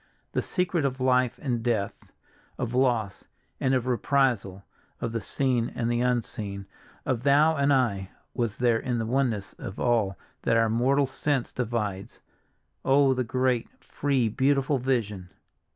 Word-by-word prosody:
The - - 0
secret 180 -3 -1
of 135 -1 -1
life 125 -1 +2
and 120 -5 -1
death, 115 -4 -2 0.5
of 120 -1 -3
loss 120 -6 +1 0.3
and 130 - +1
reprisal, 120 -6 +1 0.4
of 115 - -3
the 115 -1 -2
seen 125 +1 0
and 115 0 -1
the 120 0 +1
unseen, 110 -5 -2 0.4
of 125 -3 0
thou 145 +4 +4
and 140 -1 +2
I, 105 -8 +1 0.2
was 115 -5 -2
there 120 -2 +3
in 125 0 -2
the 115 - -1
oneness 115 -5 0
of 95 - -7
all 110 -6 +1 0.2
that 115 - +2
our 115 0 +3
mortal 130 +5 +3
sense 135 0 -1
divides. 105 -5 -3 0.6
Oh, 135 0 +4
the 130 0 0
great, 125 0 0
free, 135 -5 0
beautiful 135 +4 +1
vision! 105 -8 -1
120 Hz, 145 wpm, -27 LUFS, 115-135 Hz, 0.6 s, thou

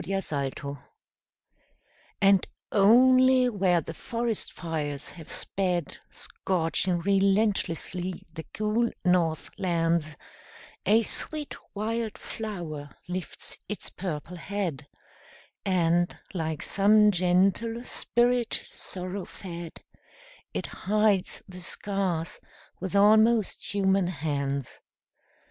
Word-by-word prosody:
FIRE 195 0 -1 0.3
FLOWERS 140 +1 -6 1.4
And 195 -1 +5 0.2
only 255 +4 +6
where 185 -6 +2
the 165 - -7
forest 230 +4 -2
fires 150 -4 -4
have 165 -4 -11
sped, 180 -5 -1
Scorching 175 0 -1
relentlessly 195 -2 +1
the 160 - -6
cool 215 +2 +1 0.2
north 170 -3 +2
lands, 165 -3 +1 0.7
A 220 +3 +5
sweet 300 +6 -2 0.2
wild 220 +1 -2
flower 170 -10 -6
lifts 180 0 -4
its 210 -3 -5
purple 175 -1 -5
head, 175 -7 -3 0.8
And, 175 -2 +2 0.2
like 160 -4 -2
some 210 +1 +5
gentle 195 +6 +2
spirit 240 -1 +1
sorrow 185 +1 -5
fed, 170 -3 -8 0.7
It - - -3
hides 210 -1 +1
the 180 -1 -9
scars 185 -3 -2 0.4
with 190 +1 -4
almost 215 +1 +4
human 195 -2 +2
hands. 140 -5 -2
190 Hz, 90 wpm, -27 LUFS, 170-210 Hz, 1.4 s, only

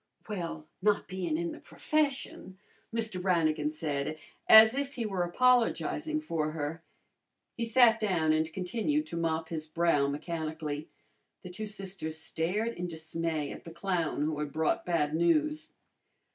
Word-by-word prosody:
"Well, 170 -7 -4 0.2
not 210 +1 +2
bein' 180 -4 -2
in 170 0 -2
the - - -9
profession," 280 - -2 0.3
Mr. 225 -5 -2
Brannigan 160 -5 +2
said 155 -1 -2 0.3
as 220 +1 +10
if 280 +1 -3
he 235 - -2
were 195 -4 -1
apologizing 250 - +2
for 155 - -2
her. 160 +1 -4 0.7
He 235 - -2
sat 230 -1 +5
down 175 -7 +2
and 155 +1 0
continued 230 - -1
to 170 - -7
mop 160 -1 -1
his 155 -2 -4
brow 155 -3 +2
mechanically. 155 0 -4 0.5
The 180 - -8
two 215 +4 -5
sisters 190 -6 -5
stared 180 +8 -1
in 180 - -2
dismay 160 -2 -3
at - - -9
the - - -9
clown 170 -3 -1
who 150 -1 -1
had 150 -1 -3
brought 160 +3 0
bad 155 -4 +1
news. 305 - +1
170 Hz, 145 wpm, -30 LUFS, 155-220 Hz, 0.7 s, as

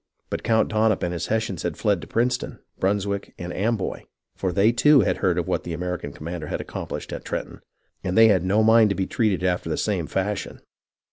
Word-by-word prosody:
But - - -2
Count 110 -1 +2
Dunop 110 -1 +1
and 90 0 -1
his 85 - -3
Hessians 110 -6 -1
had - - -3
fled 100 -4 +1
to 80 - -9
Princeton, 120 +2 -1 0.2
Brunswick, 100 +1 -1
and 90 -1 -6
Amboy; 105 -1 -2 0.3
for 95 - -1
they, 100 +5 +4
too, 145 +3 +5
had 95 - +1
heard - - +1
of - - -1
what - - -1
the 85 - -5
American 90 -3 -4
com 75 - -12
mander 85 -3 -5
had - - -3
accomplished - - -6
at - - -6
Trenton, - - -5 0.4
and 90 +2 -1
they 115 0 +8
had 95 -5 +3
no 100 +4 +3
mind 110 0 +6
to 100 - 0
be 95 - -1
treated 105 -4 0
after 90 -2 0
the 75 - -1
same 95 -7 -1
fashion. 100 +2 -3
100 Hz, 215 wpm, -24 LUFS, 90-110 Hz, 0.4 s, they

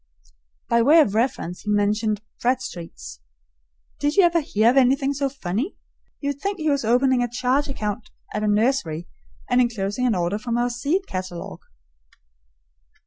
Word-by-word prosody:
By 235 0 +3
way 295 +8 +6
of 245 -11 +3
reference 220 -6 -1
he 210 - -6
mentioned 210 +1 +1 0.2
"Bradstreets." 170 - -3 0.8
Did 290 +1 0
you 395 - +6
ever 340 -1 +4
hear 225 -5 +3
of 265 - 0
anything 270 +2 +3
so 280 0 -1
funny? 255 - -3 0.5
You 285 -1 0
would 285 0 -10
think 400 0 -2
he 310 -3 0
was 280 -2 0
opening 250 +3 +3
a 245 - +1
charge 255 +4 0
account 215 -4 -4 0.2
at 210 - -2
a 215 - 0
nursery, 205 - +1 0.4
and 250 0 +3
inclosing 230 0 0
an 230 - +2
order 180 +3 -1
from 235 +1 -2
our 245 0 +1
seed 290 +11 -1
catalogue. 185 -2 -6
240 Hz, 160 wpm, -23 LUFS, 205-275 Hz, 0.8 s, way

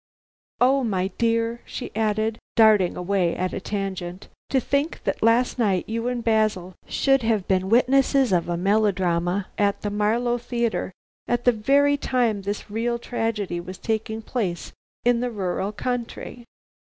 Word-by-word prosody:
Oh, 265 +2 +4
my 190 -5 0
dear," 230 0 +1
she 255 - -7
added, 220 0 0 0.2
darting 215 -5 +5
away 180 -1 0
at 185 0 -2
a - - -2
tangent, 190 -2 -4 0.2
"to 265 - +2
think 280 +5 -1
that - - -2
last 235 +3 +3
night 195 -6 +1
you 230 +2 -2
and 245 -1 -2
Basil 215 -5 +1
should 270 -1 +2
have 220 -4 0
been 190 0 +1
witnesses 265 +1 +3
of 175 -1 +1
a 170 - -1
melodrama 190 -2 +1
at 200 -1 +1
the 205 - -2
Marlow 230 +4 +1
Theatre, 235 -4 -2 0.4
at 240 0 0
the 245 - +7
very 280 +6 +3
time 240 -7 0
this 205 +1 -5
real 235 +2 -1
tragedy 225 -6 -2
was 185 +2 -8
taking 220 0 -3
place 195 -9 -3 0.3
in 245 -1 +4
the 250 +1 -1
rural 195 -2 -2
country." 240 +1 -5
220 Hz, 155 wpm, -24 LUFS, 195-240 Hz, 0.4 s, the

